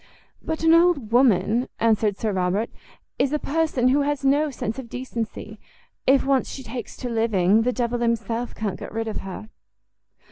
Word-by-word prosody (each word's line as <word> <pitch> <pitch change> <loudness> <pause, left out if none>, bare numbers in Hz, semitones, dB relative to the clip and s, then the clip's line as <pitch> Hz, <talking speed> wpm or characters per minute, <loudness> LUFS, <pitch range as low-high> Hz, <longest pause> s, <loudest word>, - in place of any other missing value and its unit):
"But 320 0 -4
an 325 0 +6
old 335 -9 +3
woman," 235 -1 +3
answered 215 -3 +2
Sir 220 - -1
Robert, 190 +4 0 0.5
"is 275 - +2
a - - +3
person 295 -5 +1
who 280 +3 +3
has 285 -1 -1
no 290 +3 +3
sense 230 -2 -4
of 245 -3 -8
decency; 240 -3 -6 0.5
if 270 +1 +4
once 270 -1 +1
she 265 - -7
takes 240 -1 -7
to 250 - -5
living, 225 -3 +2
the 250 +2 +1
devil 240 -1 -1
himself 235 0 -1
can't 205 -4 -3
get - - -8
rid 225 +1 -3
of 220 - -3
her." 195 +3 -7
235 Hz, 175 wpm, -23 LUFS, 220-270 Hz, 0.5 s, an